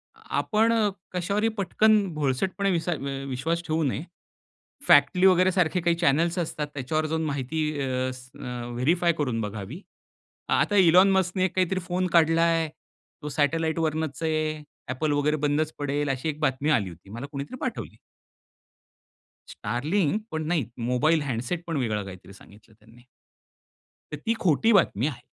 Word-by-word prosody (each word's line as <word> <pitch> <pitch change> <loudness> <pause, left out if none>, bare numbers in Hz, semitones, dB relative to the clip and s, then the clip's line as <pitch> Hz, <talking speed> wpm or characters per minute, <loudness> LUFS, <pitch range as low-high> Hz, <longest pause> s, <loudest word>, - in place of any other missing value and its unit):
आपण 225 +2 0 0.4
कश्यावरही 200 +5 0
पटकन 215 +3 +3 0.2
भोळसटपणे 155 +8 0
विसा 175 0 -1
अ, 165 - -1 0.3
विश्वास 165 +7 -2
ठेवू 160 0 0
नये. 140 +1 -1 0.8
फॅक्टली 145 +6 +5
वगैरे 185 0 +4
सारखे 180 -1 +1
काही 170 0 +2
चॅनेल्स 165 +2 +2
असतात, 155 -3 -3
त्याच्यावर 155 +3 -1
माहिती 150 0 -2 0.2
अ, 130 -1 -1
स 125 0 -13
अ, 125 -1 -5
व्हेरिफाय 170 +8 +2
करून 125 -6 -1
बघावी. 105 - -6 0.7
आता 205 - +2
इलॉन 185 +1 +6
मस्कने 185 0 +1
एक 185 - -3
काहीतरी 185 0 +1
फोन 180 +1 -1
काढला 165 0 +4
आहे, 165 -1 +2 0.5
तो 150 - -5
सॅटलाईटवरनच 160 +1 -1
आहे. 155 -1 -1 0.3
Apple 145 +3 -1
वगैरे 150 +1 +1
बंदच 150 +1 0
पडेल, 145 0 -1
अशी 135 +3 -2
एक 150 0 -5
बातमी 140 0 0
आली 100 -10 +2
होती. 85 +3 -15
मला 120 +5 -6
कोणीतरी 140 - -6
पाठवली. 235 - -4 1.5
STARLINKपण 160 - -2
नाही 160 -6 +1 0.2
मोबाईल 155 +6 +2
हॅन्डसेट 135 +5 -3
पण 165 -3 -2
वेगळा 110 -6 -1
काहीतरी 95 0 -11
सांगितलं 105 +2 -18
त्यांनी. 115 +3 -19 1.1
तर 150 - -4
ती 225 - +2
खोटी 190 +6 +3
बातमी 140 - +3
आहे. 125 -6 -6
155 Hz, 140 wpm, -26 LUFS, 135-175 Hz, 1.5 s, इलॉन